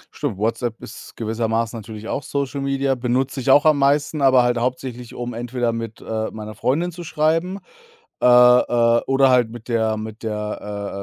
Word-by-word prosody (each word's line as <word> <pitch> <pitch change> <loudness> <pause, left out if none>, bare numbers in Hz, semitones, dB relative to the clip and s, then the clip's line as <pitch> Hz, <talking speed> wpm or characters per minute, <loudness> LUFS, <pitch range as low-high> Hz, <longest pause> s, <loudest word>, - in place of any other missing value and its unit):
Stimmt, 130 -10 -3
WhatsApp 115 +2 -2
ist - - -11
gewissermaßen 115 0 -1
natürlich 110 0 -9
auch 140 - -2
Social 140 +1 -3
Media. 135 0 0
Benutze 130 +2 -1
ich 130 - -2
auch 145 +3 +6
am 155 -2 +4
meisten, 145 +2 +1
aber 130 -2 +5
halt 120 -1 +1
hauptsächlich, 125 -1 -4
um 120 0 -5
entweder 120 0 -2
mit, 115 -1 -6
äh, 110 0 -3
meiner 110 0 -8
Freundin 160 - -1
zu 175 +1 -9
schreiben, 165 +5 0 0.6
äh, - - +4
äh, 120 -1 +5
oder 135 0 +4
halt 120 -3 +3
mit 120 0 -11
der 110 -2 +1
mit 110 0 -7
der 105 -1 -4
120 Hz, 175 wpm, -21 LUFS, 110-135 Hz, 0.6 s, auch